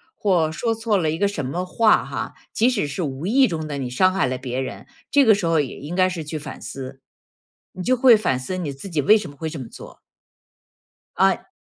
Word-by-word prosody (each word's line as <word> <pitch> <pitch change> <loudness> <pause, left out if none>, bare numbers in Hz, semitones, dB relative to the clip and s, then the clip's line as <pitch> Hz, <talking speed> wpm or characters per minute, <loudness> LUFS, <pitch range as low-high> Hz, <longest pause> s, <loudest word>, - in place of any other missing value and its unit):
或 175 -6 +1
说 225 +7 -1
错 225 -2 0
了 160 -4 0
一 160 - -3
个 200 - +2
什 155 -9 -4
么 175 +7 -3
话 220 +4 +3
哈， - - -5 0.2
即 235 +3 +3
使 210 - -1
是 145 +6 -4
无 140 +2 -4
意 260 +7 +4
中 160 -4 -4
的 145 -1 -4
你 130 -2 -3
伤 185 +9 +3
害 190 - +1
了 130 0 -2
别 125 0 -4
人， 130 - -6 0.2
这 285 -1 +5
个 220 -3 +6
时 195 -4 -3
候 165 -2 +2
也 140 -4 -3
应 155 +5 -6
该 185 0 +4
是 170 -3 -5
去 155 +1 -5
反 145 -2 -8
思， 135 0 -8 0.7
你 185 -1 -6
就 255 - +3
会 245 -2 +7
反 130 -11 0
思 185 +8 -4
你 160 -6 -3
自 140 +9 -9
己 155 -4 0
为 215 +10 +6
什 190 -7 -6
么 140 - -13
会 160 -1 -4
这 155 - -7
么 125 - -7
做。 - - -12 1.2
啊 - - +2
165 Hz, 260 characters per minute, -22 LUFS, 140-205 Hz, 1.2 s, 会